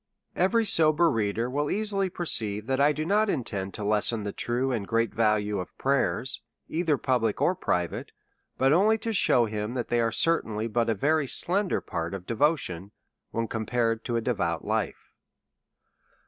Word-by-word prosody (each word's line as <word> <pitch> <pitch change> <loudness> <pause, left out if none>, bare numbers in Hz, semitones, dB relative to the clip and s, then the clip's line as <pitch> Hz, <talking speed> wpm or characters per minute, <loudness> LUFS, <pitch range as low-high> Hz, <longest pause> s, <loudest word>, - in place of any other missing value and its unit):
Every 220 +6 +2
sober 160 -2 +4
reader 110 +1 -1
will 145 +3 -1
easily 200 -2 0
perceive 110 - -1
that 130 +2 -1
I 145 +1 +5
do 155 +1 -3
not 210 +4 +2
intend 100 - -3
to 105 - -5
lessen 105 +1 +1
the 100 - -3
true 125 +5 -1
and 110 -6 -2
great 115 0 0
value 105 -2 +1
of 90 - -8
pray 135 0 +2
ers, 130 - -1 0.3
either 160 -3 0
public 120 -6 0
or 180 - +3
private, 90 - -2 0.5
but 135 +2 +3
only 210 +6 +4
to 225 +1 -3
shew 125 - +3
him 105 +2 -4
that 120 -2 -3
they 120 0 +2
are 115 -1 +1
certainly 115 -8 0
but 115 +1 0
a 115 - +1
very 150 +6 +1
slender 190 +7 0
part 85 +3 -4
of 90 -2 -8
devotion, 115 - 0 0.4
when 115 0 -2
compared 115 0 -1
to 120 - -2
a 115 - +1
devout - - -1
life. - - -3
120 Hz, 175 wpm, -27 LUFS, 110-155 Hz, 0.5 s, I